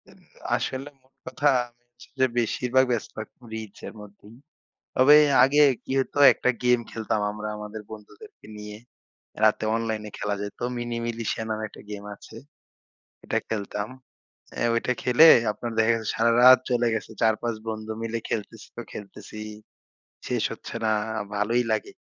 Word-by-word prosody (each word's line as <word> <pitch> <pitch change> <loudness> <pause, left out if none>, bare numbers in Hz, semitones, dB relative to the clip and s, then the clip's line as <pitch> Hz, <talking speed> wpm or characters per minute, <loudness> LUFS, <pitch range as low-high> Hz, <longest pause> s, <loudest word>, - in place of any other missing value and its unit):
M - - -19 0.4
আসলে 135 +2 -3
মোট 130 +1 -33
কথা 130 +3 0 0.2
আমি 120 0 -29
হচ্ছি 120 0 -18
যে, 130 - +5
বেশিরভাগ 125 +3 +2
ব্যস্ত 120 -3 -2
থাকতাম 110 +3 -9
রিচ 110 -2 -7
এর - - -9
মধ্যেই। 105 +1 -15 0.6
তবে 135 +4 +7 0.3
আগে 145 +3 +4 0.2
কি - - -7
হতো? 135 - -3 0.2
একটা - - -1
গেম 125 0 +4
খেলতাম 110 -1 -2
আমরা 105 0 -6
আমাদের 105 +1 -7
বন্ধুদেরকে 110 - -13
নিয়ে। 105 0 -8 0.7
রাতে 110 0 +3
অনলাইনে 110 -2 -3
খেলা 105 -1 -1
যেত। 105 0 -7 0.2
'Mini 120 -1 -4
Militia' 115 -1 -3
নামে 110 0 -2
একটা - - -14
গেম 100 -1 -7
আছে। - - -14 0.9
ঐটা - - -1
খেলতাম। 105 -1 -3 0.7
অ্যা - - -1
ঐটা 120 +2 0
খেলে 125 +6 +7 0.2
আপনার 115 +3 -6
দেখা 110 0 +4
গেছে 110 -2 -3
সারারাত 120 +3 +6
চলে 120 -1 +2
গেছে। 110 0 -4
৪-৫ 110 +1 +1
বন্ধু 110 0 -5
মিলে 115 0 -2
খেলতেছি 105 -3 -5
তো - - -5
খেলতেছিই। 105 +1 -9 0.8
শেষ - - -1
হচ্ছে - - -10
না। 110 - +2 0.4
ভালোই 115 +4 +1
লাগে। 110 - -1
110 Hz, 150 wpm, -25 LUFS, 105-120 Hz, 0.9 s, তবে